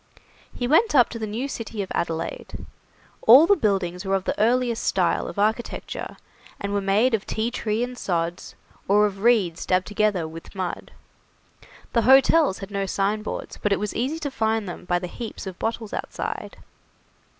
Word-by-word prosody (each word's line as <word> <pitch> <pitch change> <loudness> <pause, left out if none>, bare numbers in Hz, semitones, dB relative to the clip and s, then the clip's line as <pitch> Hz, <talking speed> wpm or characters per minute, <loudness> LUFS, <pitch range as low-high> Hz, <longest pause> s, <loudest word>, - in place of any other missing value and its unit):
He 245 - -3
went 325 - +4
up 245 -3 +6
to 230 - -6
the 220 - -3
new 230 +6 -3
city 225 -5 -5
of 190 - -10
Adelaide. 165 -1 -4 0.6
All 260 +8 +8
the 405 - +5
buildings 190 - -1
were 195 0 0
of 190 - -1
the - - -2
earliest 235 +1 +2
style - - +1
of - - -8
architecture, 220 +3 -2 0.4
and 200 0 -3
were 200 - +1
made 205 +6 +2
of 215 -3 -1
tea 220 +2 -1
tree 220 -1 -1
and 250 0 -4
sods, 170 -5 -3 0.3
or 210 +2 +5
of 200 -2 -3
reeds 205 -7 +2
dabbed 185 0 +1
together 205 -6 0
with 165 +4 -11
mud. 185 -2 -4 1.0
The 235 - +3
hotels 270 +1 +5
had 195 +1 -8
no 200 -1 -2
signboards, 205 +3 -2
but 210 - 0
it 200 - +2
was 210 0 -3
easy 270 +7 -1
to 295 -3 -4
find 220 -3 0
them 180 0 -7
by 175 0 +1
the 180 - -4
heaps 225 +5 -7
of 190 -2 -7
bottles 225 -1 -3
outside. - - -5
210 Hz, 180 wpm, -24 LUFS, 190-240 Hz, 1.0 s, All